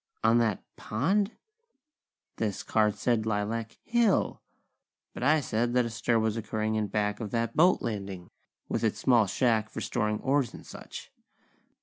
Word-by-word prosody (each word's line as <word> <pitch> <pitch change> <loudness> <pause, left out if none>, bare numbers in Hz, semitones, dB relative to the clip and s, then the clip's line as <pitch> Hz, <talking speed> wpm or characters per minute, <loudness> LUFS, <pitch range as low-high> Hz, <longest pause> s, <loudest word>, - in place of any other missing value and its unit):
On 115 +1 +5
that 110 -4 0
pond? 195 - 0 1.0
This 105 -3 -2
card 105 -2 +2
said 115 -3 0
Lilac 110 +2 -2
Hill! 235 -3 +1 0.7
But - - -8
I 150 +4 +4
said 120 -1 -1
that 125 -1 +4
a 115 - -4
stir 115 +1 +1
was 110 -1 +1
occurring 110 0 -2
in 110 -1 0
back 105 0 -1
of 110 -3 -4
that 115 +1 -1
boat 180 +4 +4
landing, 100 -5 -5 0.4
with - - -2
its 110 - +1
small 120 -5 +4
shack 110 +1 +1
for - - -6
storing 105 -3 -1
oars 135 -1 +1
and - - -12
such. - - -10
110 Hz, 155 wpm, -28 LUFS, 105-125 Hz, 1.0 s, On